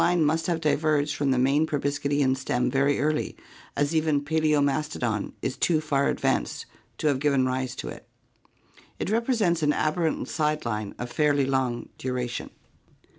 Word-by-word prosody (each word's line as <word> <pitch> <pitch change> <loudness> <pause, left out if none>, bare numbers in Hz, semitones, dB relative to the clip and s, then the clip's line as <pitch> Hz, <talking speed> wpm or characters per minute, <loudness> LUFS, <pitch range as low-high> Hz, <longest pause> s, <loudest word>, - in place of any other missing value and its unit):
luie 175 - +3
must 160 0 +1
have 170 -2 0
di 155 -2 +2
verged 150 -1 +1
from 145 -1 0
the 130 - +2
main 140 +5 +3
proboscidean 145 -2 0
stem 125 -2 -1
very 140 +1 +2
early, 155 +1 -1 0.4
as 145 +2 +1
even 155 -2 +1
Pdaimiastodon 150 -7 0
is 130 - -1
too 165 -3 +2
far 140 -2 +1
advanced - - -1 0.3
to - - -5
have 140 -3 +2
given 140 -2 +2
rise 130 -1 -2
to - - -6
it. - - -9 0.9
It - - -3
represents 225 -7 +1
an 150 -1 +3
aberrant 160 +1 0
side 150 -2 -1
line 105 -3 -3
of 120 0 -5
fairly 145 -2 +2
long 130 -3 -1
duration. 125 -1 -3
145 Hz, 160 wpm, -26 LUFS, 130-155 Hz, 0.9 s, luie